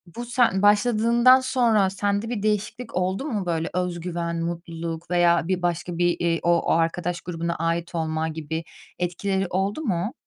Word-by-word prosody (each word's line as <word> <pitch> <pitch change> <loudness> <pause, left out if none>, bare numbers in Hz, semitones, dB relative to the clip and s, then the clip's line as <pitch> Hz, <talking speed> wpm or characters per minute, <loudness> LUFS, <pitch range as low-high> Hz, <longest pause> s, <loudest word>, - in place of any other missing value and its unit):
bu 240 - -5
sen 235 -5 +2
başladığından 235 +4 +5
sonra 235 -6 +2
sende 200 +3 -1
bir 220 -4 -3
değişiklik 215 +3 -2
oldu 185 +7 -1
mu 215 -10 -2
böyle 165 -2 -1
özgüven, 170 -1 -2
mutluluk 170 -1 -5
veya 175 -1 +3
bir 185 -1 0
başka 175 0 -2
bir, 175 0 +2
iii, 170 -1 +1
o 170 0 +2
arkadaş 170 +1 0
grubuna 170 -1 -3
ait 165 +2 -2
olma 160 -1 -1
gibi 160 0 -4 0.4
etkileri 190 +2 -1
oldu 195 - -1
mu? 205 - -1
180 Hz, 150 wpm, -24 LUFS, 170-210 Hz, 0.4 s, başladığından